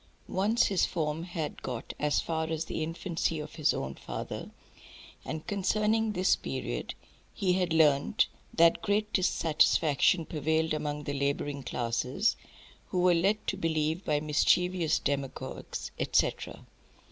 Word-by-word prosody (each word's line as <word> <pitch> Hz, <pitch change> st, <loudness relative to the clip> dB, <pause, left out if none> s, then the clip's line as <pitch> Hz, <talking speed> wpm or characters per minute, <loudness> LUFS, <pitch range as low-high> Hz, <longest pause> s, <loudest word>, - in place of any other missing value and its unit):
Once 215 Hz, +5 st, +2 dB
his 195 Hz, -3 st, +1 dB
form 155 Hz, -1 st, -1 dB
had 170 Hz, -3 st, -5 dB
"got" 125 Hz, -2 st, -5 dB
as 150 Hz, 0 st, +2 dB
far 160 Hz, -1 st, -2 dB
as 160 Hz, 0 st, -2 dB
the -, -, -4 dB
infancy 165 Hz, 0 st, -2 dB
of 150 Hz, -, -7 dB
his 155 Hz, -3 st, +2 dB
own 65 Hz, 0 st, -3 dB
father, -, -, -6 dB, 0.7 s
and 155 Hz, 0 st, -5 dB
concerning 215 Hz, +2 st, +1 dB
this 185 Hz, -1 st, +3 dB
period -, -, -4 dB, 0.4 s
he 190 Hz, -3 st, +1 dB
had 180 Hz, -2 st, 0 dB
learnt 145 Hz, -, +4 dB, 0.3 s
that 165 Hz, 0 st, +4 dB
"great 210 Hz, 0 st, 0 dB
dissatisfaction 165 Hz, -2 st, +3 dB
prevailed 160 Hz, +1 st, 0 dB
among 150 Hz, -1 st, -3 dB
the 145 Hz, -, -3 dB
labouring 140 Hz, 0 st, -1 dB
classes, 125 Hz, -, 0 dB, 0.5 s
who 185 Hz, -, -1 dB
were 180 Hz, 0 st, +5 dB
led 195 Hz, +6 st, +1 dB
to -, -, -1 dB
believe 160 Hz, +2 st, -1 dB
by 150 Hz, -1 st, +1 dB
mischievous 165 Hz, +3 st, +2 dB
demagogues," 140 Hz, -2 st, -4 dB
etcetera. -, -, 0 dB
160 Hz, 135 wpm, -29 LUFS, 150-185 Hz, 0.7 s, were